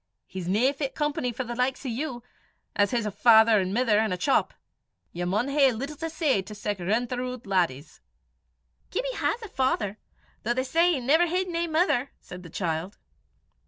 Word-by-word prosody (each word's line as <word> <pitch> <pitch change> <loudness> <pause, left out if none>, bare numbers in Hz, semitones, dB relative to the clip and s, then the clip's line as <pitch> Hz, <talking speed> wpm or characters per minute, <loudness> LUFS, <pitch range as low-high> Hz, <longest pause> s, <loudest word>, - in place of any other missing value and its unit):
"He's 185 -2 -7
no 230 +9 +2
fit 275 -1 -4
company 295 -4 -1
for 245 +3 -4
the 240 -1 -5
likes 255 +3 -1
o' - - -2
you, 245 0 -4 0.5
'at 205 -1 +3
his 235 -1 -1
a 210 - -2
father 220 +1 +6
an' 185 -1 -1
mither, 225 -1 +2
an' 220 -2 +1
a 180 - -1
chop 270 +9 +2
(shop). - - -33 0.5
Ye 175 - -3
maun 210 +9 0
hae 275 -2 +4
little 275 +6 -5
to 325 +1 -4
say 310 - +1
to 210 +3 -10
sic 205 -1 -3
rintheroot 245 +6 -2
laddies." 170 -7 -1 0.9
"Gibbie - - -2
has 475 - -1
a - - -6
father, 235 - -1 0.4
though 240 +2 -1
they 260 - 0
say 335 +7 +3
he 285 - -1
never 310 +8 +3
hid 365 +2 -1
nae 340 0 -1
mither," 310 -5 +1
said 180 0 -10
the 175 - -11
child. 170 +3 -3
245 Hz, 195 wpm, -26 LUFS, 205-280 Hz, 0.9 s, father